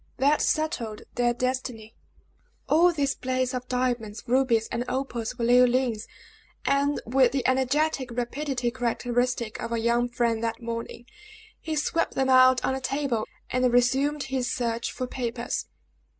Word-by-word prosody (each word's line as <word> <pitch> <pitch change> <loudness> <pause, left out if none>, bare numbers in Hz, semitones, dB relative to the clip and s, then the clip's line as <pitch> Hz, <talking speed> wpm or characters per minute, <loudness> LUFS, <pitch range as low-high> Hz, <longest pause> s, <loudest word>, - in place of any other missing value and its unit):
That 285 +3 +3
settled 260 -9 -1
their 240 0 +2
destiny. 245 -3 -3 0.7
All 345 +3 +5
this 285 -4 0
blaze 255 0 -1
of 250 0 -4
diamonds, 245 -4 -2
rubies, 240 -3 +2
and 235 +1 -1
opals 250 -3 -3
were 235 - -1
Leoline's; 245 -2 +3 0.6
and 280 +1 +2
with 255 +1 +3
the 265 -3 -1
energetic 265 +1 +1
rapidity 245 +1 -2
characteristic 245 -1 -1
of - - -4
our 235 - 0
young 235 +1 +1
friend 235 -1 0
that 225 0 -2
morning, 230 0 -6 0.5
he 315 -1 -4
swept 310 +2 0
them 265 0 +1
out 255 0 +6
on 265 - +1
the 265 - -3
table, 265 -4 -1 0.2
and 255 -1 +2
resumed 270 +4 +2
his 260 -2 -2
search 235 -2 -2
for 255 - -4
papers. 240 -1 -3
250 Hz, 145 wpm, -26 LUFS, 235-265 Hz, 0.7 s, out